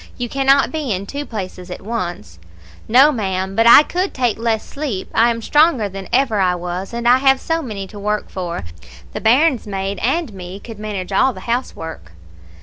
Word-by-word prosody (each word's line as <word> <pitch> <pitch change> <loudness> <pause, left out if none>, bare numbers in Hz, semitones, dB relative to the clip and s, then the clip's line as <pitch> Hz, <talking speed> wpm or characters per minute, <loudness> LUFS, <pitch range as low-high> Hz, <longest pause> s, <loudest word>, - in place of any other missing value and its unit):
You 245 - -3
cannot 275 +1 +3
be 305 -6 -3
in 195 0 -2
two 285 +7 -6
places 185 -4 -6
at 180 - -8
once.' 175 - -5 0.5
"'No, 265 +6 +6
ma'am, 190 -5 -2
but 225 +2 +4
I 260 +5 +9
could 365 +5 -2
take 245 -4 0
less 225 -1 -1
sleep. 275 -10 -5
I 230 +1 +4
am 230 -1 -3
stronger 295 -7 +3
than 195 0 -8
ever 250 -5 +2
I 180 -2 +2
was; 180 +2 -5
and 235 0 -3
I 250 +1 +6
have 270 0 +4
so 325 +3 -1
many 210 -8 -5
to 205 +2 -11
work 210 +1 -2
for. 175 - -4 0.5
The - - -5
bairns 255 +1 +3
maid 195 0 -3
and 270 0 -1
me 185 0 -8
could 225 0 -10
manage 205 -3 -5
all 255 +7 +3
the 185 - -10
housework.' 165 - -4
220 Hz, 195 wpm, -19 LUFS, 190-260 Hz, 0.5 s, I